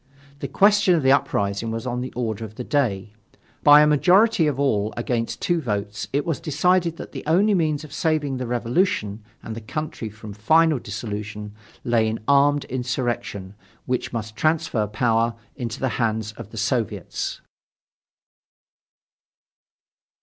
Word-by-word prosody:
The 140 - -4
question 200 - +4
of 160 - 0
the 130 - +5
uprising 115 -6 +1
was 115 +2 -4
on 125 -1 -2
the 130 - -5
order 115 -3 -3
of 110 -1 -8
the 125 - -5
day. 105 -8 -1 0.5
By 145 0 +8
a - - +6
majority 180 +5 +4
of 140 -3 -1
all 110 -7 +1
against 120 -1 -2
two 175 -3 +1
votes 105 -4 -3
it 145 +2 0
was 165 -4 -1
decided 170 +2 +1
that - - -8
the - - -7
only 195 +7 +4
means 155 -5 0
of 150 -2 -11
saving 150 -4 0
the 125 -1 -4
Revolution 120 - 0 0.2
and 110 - -6
the 115 - -7
country 145 -2 -5
from 105 0 -10
final 155 +8 +3
dissolution 105 -1 -6 0.3
lay 115 -3 +2
in 110 +1 -2
armed 140 +1 +4
insurrection 120 -6 -3 0.3
which 125 -1 -2
must 110 -2 -5
transfer 155 -5 0
power 115 +2 +1 0.2
into 120 -4 -5
the 130 - 0
hands 110 -1 -1
of 110 -1 -10
the 115 - -11
Soviets. 115 0 -2
125 Hz, 150 wpm, -23 LUFS, 110-150 Hz, 0.5 s, By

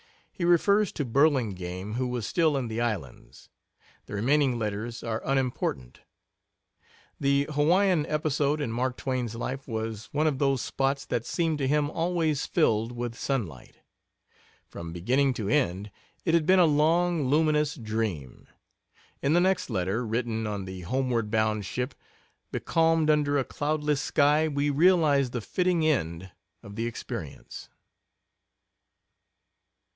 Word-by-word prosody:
He 180 - -6
refers 200 +4 +3
to 145 - -2
Burlingame, 105 - 0
who 125 +2 -1
was 125 -3 -3
still 160 -1 +2
in 130 -3 -2
the 115 +1 -3
islands. 100 - -5 0.6
The - - -6
remaining 130 +4 +2
letters 110 +2 -4
are 115 -1 -3
unimportant. 125 - -2 1.2
The 140 0 +2
Hawaiian 170 +3 +3
episode 150 -1 0
in 140 -6 -2
Mark 125 +2 -1
Twain's 125 -4 -3
life 130 +3 -5
was 110 -2 -4
one 150 +2 +1
of 145 -4 0
those 135 -2 +2
spots 135 0 -1
that 115 - -3
seemed 165 -3 0
to 135 - 0
him 150 +1 +1
always 165 -3 0
filled 115 -8 +1
with 120 -1 -4
sunlight. 110 - -4 0.9
From 85 -1 -8
beginning 125 +10 +1
to 105 -4 -3
end 100 -7 0 0.3
it 165 - +1
had 165 -2 +3
been 190 +1 +6
a 180 - +6
long 160 0 +2
luminous 150 0 +2
dream; 110 - -4 0.7
in 140 +2 +2
the 175 - +5
next 190 -2 +1
letter, 100 +2 -1
written 115 -1 -2
on 100 -2 -4
the 95 -1 -7
homeward 120 +2 -1
bound 110 -1 +1
ship, 125 +2 -3 0.6
becalmed 165 -1 +2
under 145 -1 +2
a 135 - +2
cloudless 150 +1 -1
sky, 150 +2 +3
we 145 -1 0
realize 150 -4 +4
the 120 -1 -4
fitting 180 - 0
end 95 - -1 0.3
of 100 0 -10
the 115 +2 -2
experience. 120 - -7
135 Hz, 140 wpm, -27 LUFS, 110-150 Hz, 1.2 s, been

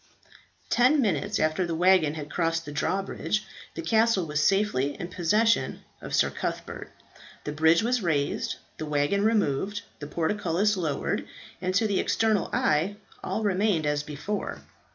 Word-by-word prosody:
Ten 255 +5 +4
minutes 195 - 0
after 155 +4 +1
the 170 -2 -2
waggon 175 -3 +4
had 150 -1 -7
crossed 165 -1 0
the 145 - -7
drawbridge, 195 +6 -1 0.3
the 165 - -5
castle 220 0 +3
was 150 -1 -1
safely 150 -8 +1
in 175 - -5
possession 210 +6 +1 0.2
of - - -3
Sir - - +3
Cuthbert. - - -5 0.5
The 150 - -4
bridge 160 +5 +4
was 245 +1 +1
raised, 150 -6 0 0.2
the 155 - -4
waggon 150 +7 +1
removed, 205 -2 +1 0.2
the 145 - -6
portcullis 180 +4 0
lowered, 160 -6 -2 0.3
and 185 0 -1
to 220 +3 +3
the 200 -3 +1
external 220 -3 +1
eye 165 +7 +1 0.3
all 220 - -2
remained 195 -4 +1
as 150 0 +1
before. 150 +8 -5
180 Hz, 150 wpm, -27 LUFS, 155-210 Hz, 0.5 s, Ten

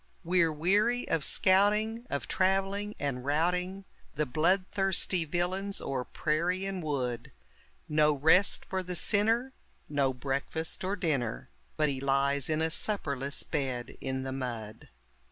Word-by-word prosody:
We're 170 -1 +3
weary 205 +10 +1
of 160 - 0
scouting, 210 - +3
of - - -3
traveling, 195 +2 0
and 140 -3 -3
routing 180 +6 0 0.3
The 150 +2 0
blood 170 +8 +2
thirsty 195 -3 +1
villains 185 +5 -2
o'er 130 -2 -3
prairie 170 +5 -1
and 195 -2 -3
wood; 125 -6 -3 0.6
No 150 0 +3
rest 160 +7 +4
for 190 0 -2
the 180 0 -5
sinner, 225 +8 +2 0.3
no 140 -2 +1
breakfast 140 +6 -2
or 190 +2 -1
dinner, 140 - -2 0.3
But 150 -1 +2
he 135 -1 -3
lies 140 0 +1
in 155 0 +1
a 160 - 0
supperless 140 -9 -1
bed 130 -5 -3
in 130 -1 -3
the 135 - -4
mud. 115 -5 -6
160 Hz, 135 wpm, -30 LUFS, 140-190 Hz, 0.6 s, rest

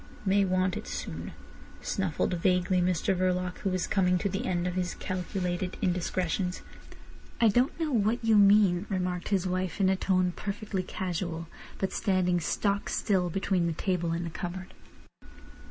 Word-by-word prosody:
"May 195 +1 +3
want 185 -1 +1
it - - -7
soon," - - -5 0.5
snuffled 185 -2 -1
vaguely 180 +1 +2
Mr 180 +2 +1
Verloc, 180 0 0
who 195 - -1
was 185 -1 0
coming 180 -2 +2
to 200 +2 -1
the 200 +7 -3
end 175 -1 0
of 180 - -1
his 180 -1 -2
calculated 180 -1 -3
indiscretions. 180 0 -1 0.8
"I 230 - +6
don't 245 +10 +1
know 320 -2 -1
what 225 0 +1
you 225 -1 +5
mean," 200 -2 +5
remarked 180 -2 -2
his 195 -3 +1
wife 185 +1 -2
in 190 -1 +4
a 190 - +3
tone 185 -1 +1
perfectly 205 -1 -3
casual, 175 -3 -4 0.3
but 190 - -2
standing 185 -4 +1
stock 200 +4 -1
still 185 -5 +1
between 185 -1 0
the 165 - 0
table 175 0 -1
and 170 +1 -2
the 165 - -5
cupboard. 180 +3 -6
185 Hz, 160 wpm, -29 LUFS, 180-195 Hz, 0.8 s, I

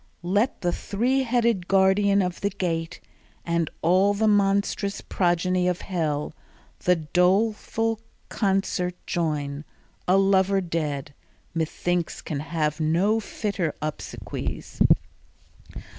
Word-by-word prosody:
Let 205 +8 +1
the 175 -2 +1
three 245 +10 0
headed 235 -7 +1
guardian 195 +1 +4
of 180 -1 -4
the 200 - +1
gate, 165 -4 -3 0.5
And 170 -1 0
all 190 +4 +4
the 220 +2 +2
monstrous 200 0 +2
progeny 180 0 +1
of 180 -1 0
hell, 155 -6 -2 0.5
The 180 - +5
doleful 210 +7 +1 0.3
concert 190 -3 0
join: 150 -4 -2 0.4
a 185 +2 +5
lover 195 0 +3
dead 150 -6 -3 0.4
Methinks 170 +1 -2
can 145 - -3
have 155 0 -1
no 175 +8 +2
fitter 200 -6 -3
obsequies. 155 0 -5
180 Hz, 105 wpm, -25 LUFS, 165-200 Hz, 0.5 s, The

